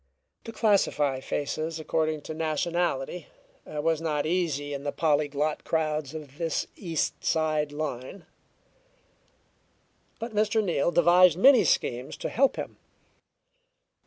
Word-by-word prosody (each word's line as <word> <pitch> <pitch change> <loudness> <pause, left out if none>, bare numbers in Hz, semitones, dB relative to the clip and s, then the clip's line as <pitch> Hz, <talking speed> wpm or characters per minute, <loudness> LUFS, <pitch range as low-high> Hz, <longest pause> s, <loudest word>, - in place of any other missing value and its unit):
To 230 - -6
classify 195 - +2
faces 155 +4 -3
according 155 -1 -1
to 155 - -7
nationality 165 0 -2 0.4
was 155 +1 -1
not 150 -3 -1
easy 155 -4 -1
in 140 0 -5
the 145 - -2
polyglot 150 -1 0
crowds 155 -2 -1
of 150 -1 -9
this 165 -2 -1
East 165 -5 -3
Side 155 -2 0
line. 150 +3 -5 1.9
But 230 0 -6
Mr. 215 +1 +2
Neal 170 -5 +1
devised 175 0 +5
many 255 +2 +7
schemes 125 -5 0
to - - -4
help 275 +2 +2
him. - - -6
155 Hz, 115 wpm, -27 LUFS, 145-175 Hz, 1.9 s, many